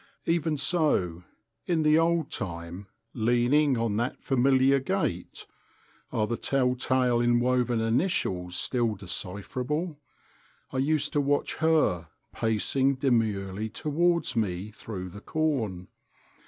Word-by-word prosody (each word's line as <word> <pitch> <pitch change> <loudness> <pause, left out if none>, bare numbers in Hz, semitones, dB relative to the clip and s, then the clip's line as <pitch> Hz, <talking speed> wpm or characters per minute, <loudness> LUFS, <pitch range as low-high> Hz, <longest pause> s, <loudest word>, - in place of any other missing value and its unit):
Even 165 -2 +1
so, 135 - +1 0.4
in 165 -3 +1
the 155 +1 +5
old 165 -2 +1
time, 85 -1 -5 0.3
leaning 120 +4 +2
on 115 -3 0
that 120 +3 -2
familiar 135 +1 +3
gate—are 115 -3 -4
the 120 +2 -3
tell 130 -2 +1
tale 125 -1 +1
inwoven 120 0 +2
initials 115 - 0
still 120 -1 +1
decipherable?—I 130 - -6
used 150 +2 +1
to 145 - +2
watch 145 +1 0
Her 155 - +2 0.3
pacing 130 +5 +1
demurely 110 -6 0
towards 165 +3 0
me 100 -2 -2
through 95 -4 -7
the 100 +3 -11
corn. 115 - -1
125 Hz, 105 wpm, -27 LUFS, 105-145 Hz, 0.4 s, the